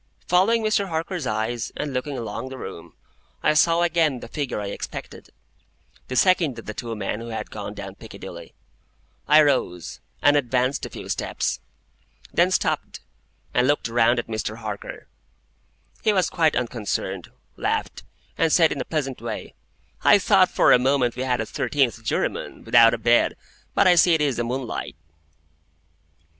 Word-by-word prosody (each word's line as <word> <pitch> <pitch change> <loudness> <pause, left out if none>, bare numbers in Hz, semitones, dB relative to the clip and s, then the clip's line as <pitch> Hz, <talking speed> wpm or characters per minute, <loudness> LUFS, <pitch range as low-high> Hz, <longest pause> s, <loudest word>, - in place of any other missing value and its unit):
Following 210 +6 +3
Mr. 215 -2 +1
Harker's 165 -2 -3
eyes, 110 +2 -2
and 145 -2 -3
looking 135 +2 -3
along 120 +2 -5
the 130 - -8
room, 85 -9 -9 0.5
I 150 - +4
saw 165 +2 +4
again 160 -6 +2
the - - -9
figure 140 -2 -3
I 105 - -4
expected,—the 130 - -10
second 170 -6 +3
of 115 - -9
the 105 - -5
two 115 +1 -5
men 105 0 -3
who 115 - -7
had 115 -1 -5
gone 105 -1 -6
down 95 -1 -7
Piccadilly. 95 -5 -11 0.7
I 150 +1 +7
rose, 125 - -1 0.2
and 145 +1 +4
advanced 130 0 0
a - - -12
few - - -9
steps; - - -2 0.7
then - - +4
stopped, - - -1 0.5
and 125 +1 +3
looked 145 -4 +1
round 120 +1 +3
at 120 - -1
Mr. 110 -1 -4
Harker. 105 -3 -7 0.9
He 215 - +3
was 185 -4 +1
quite 160 -3 +2
unconcerned, 105 -6 -3 0.3
laughed, - - -2 0.4
and 165 -1 +3
said 165 -1 +5
in - - -2
a - - -4
pleasant 135 -7 -3
way, 115 -2 -6 0.5
"I - - +7
thought - - +4
for - - +4
a - - +7
moment 130 -2 +1
we 125 - -4
had 125 -2 0
a - - -2
thirteenth 120 -2 0
juryman, - - -2
without 115 0 +6
a - - -6
bed. 120 +1 +3 0.4
But 200 - +4
I 180 - +7
see 175 -1 +5
it 160 - 0
is 140 -4 +1
the 120 - 0
moonlight." 125 -5 -4
125 Hz, 165 wpm, -23 LUFS, 115-150 Hz, 0.9 s, I